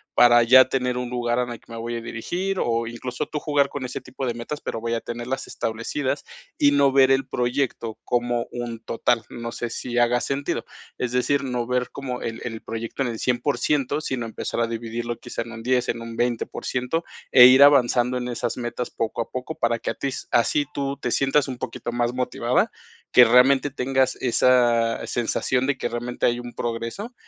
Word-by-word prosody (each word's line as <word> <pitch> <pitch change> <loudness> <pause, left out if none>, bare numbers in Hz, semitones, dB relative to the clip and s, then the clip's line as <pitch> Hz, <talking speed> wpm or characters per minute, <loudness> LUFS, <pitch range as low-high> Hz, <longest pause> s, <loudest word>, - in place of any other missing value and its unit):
para 120 0 +7
ya 130 +3 +8
tener 125 -2 0
un 125 -1 -3
lugar 120 -1 -1
en 125 -1 -1
el 120 - -7
que - - -19
me 115 - -6
voy 120 +1 -4
a - - -5
dirigir, 175 +12 -3
o 115 0 0
incluso 120 +2 -5
tú 150 - -4
jugar 145 -2 +1
con 140 -2 -5
ese 125 - -5
tipo 130 +1 -6
de 120 - -1
metas, 120 +6 -6
pero 115 - -4
voy 115 0 -2
a 115 - -3
tenerlas 120 +3 -4
establecidas 130 +5 -3 0.3
y 145 - +4
no 140 -1 +4
ver 135 0 +5
el 135 0 +2
proyecto 125 -3 -2
como 120 -1 0
un 120 -2 -5
total, 115 0 0
no 115 0 -6
sé, 120 0 -4
si 120 +1 -4
haga 120 0 +3
sentido. 140 +1 -2 0.3
Es 125 - -2
decir, 140 +3 +1
no 125 -3 -2
ver 125 0 0
como 130 -3 -5
el 115 0 -5
el 115 -2 -5
proyecto 115 +3 -5
en 125 - -1
el 115 -2 -5
100% 135 +3 0
sino 130 -5 -3
empezar 115 +1 -4
a 115 - +1
dividirlo 115 +1 -4
quizá - - -5
en 115 - -11
un 115 0 -8
10 125 0 +1
en 115 - -2
un 115 0 -7
20% 125 +5 -2 0.3
e 125 -2 +10
ir 130 +2 +8
avanzando 125 -3 +4
en 125 - -3
esas 120 -1 -3
metas 120 0 -4
poco 115 +1 -2
a 115 - -5
poco 130 +5 -5
para 115 -6 0
que - - -2
a - - -4
ti 140 - -2 0.2
así 145 +5 +2
tú 140 0 -2
te 125 - -3
sientas 135 +3 +2
un 130 -2 -5
poquito 120 - -5
más 120 0 0
motivada, 125 0 0 0.4
que 125 - +8
realmente 130 +4 +5
tengas 130 -1 0
esa 120 -2 +3
sensación 125 +2 0
de 140 - 0
que - - -2
realmente 120 +1 -3
hay 120 0 +2
un 120 0 -8
progreso, 120 - -4
125 Hz, 205 wpm, -24 LUFS, 120-130 Hz, 0.4 s, e